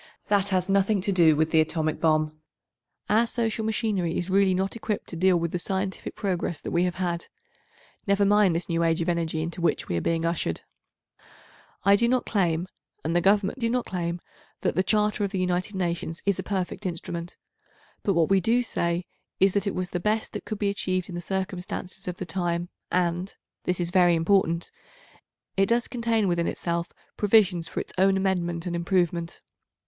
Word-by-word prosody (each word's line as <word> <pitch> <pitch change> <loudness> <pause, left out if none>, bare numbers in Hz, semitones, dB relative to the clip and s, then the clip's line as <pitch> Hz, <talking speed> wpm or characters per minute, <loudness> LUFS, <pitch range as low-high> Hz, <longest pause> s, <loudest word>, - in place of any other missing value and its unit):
That 200 -1 +3
has 185 -2 +1
nothing 195 +1 +2
to 200 +1 0
do 170 -5 +5
with 160 +1 +1
the 160 - +5
atomic 155 0 -1
bomb. 155 -1 +2 0.7
Our 225 +3 +3
social 225 -2 -1
machinery 215 -6 0
is 180 +1 -3
really 195 -1 +4
not 190 +3 -1
equipped 215 -2 -3
to - - -5
deal 185 +1 +4
with 170 -1 -2
the 180 - -2
scientific 190 +1 -3
progress 180 -5 -2
that - - -5
we 175 +1 +2
have 180 -1 -2
had—never 200 - -4
mind 205 -3 +4
this 170 - -2
new 170 -1 0
age 165 0 +2
of 165 - 0
energy 165 -2 -1
into 170 +2 -5
which 170 - +1
we 85 - -2
are 85 - 0
being 165 0 0
ushered. 165 - -1 1.2
I 200 0 +7
do 235 +3 +3
not 250 +1 +1
claim, 175 -4 0 0.4
and 165 +2 -1
the 175 - +4
Government 200 +6 +2
do 230 -2 +1
not 245 +1 0
claim, 175 -1 -3 0.4
that - - +1
the 185 - +2
Charter 210 +1 +1
of 200 - 0
the 190 - -3
United 185 +2 -1
Nations 170 -2 -2
is 200 -2 +1
a - - +1
perfect 190 -1 -3
instrument, 170 0 -5 0.6
but 195 - +1
what 165 -2 +3
we 195 - +6
do 235 +6 +2
say 170 -5 -1 0.3
is 195 -1 +4
that 200 0 0
it 200 - -1
was 185 0 -3
the 180 - -1
best 215 +4 -1
that - - -6
could 215 - -4
be 205 -1 0
achieved 185 -2 -2
in - - -7
the 175 - -4
circumstances 190 0 -4
of 180 0 -3
the 185 - -4
time 175 0 -2 0.2
and—this 180 0 -2
is 175 -1 -1
very 175 -2 +5
important—it 190 - -2
does 235 +1 +2
contain 230 -4 0
within 170 -1 +1
itself 170 0 -2 0.3
provisions 195 -5 +3
for - - -4
its - - -6
own 195 0 +4
amendment 175 -3 -1
and 175 -1 -2
improvement. 170 -1 -1
185 Hz, 190 wpm, -26 LUFS, 170-200 Hz, 1.2 s, I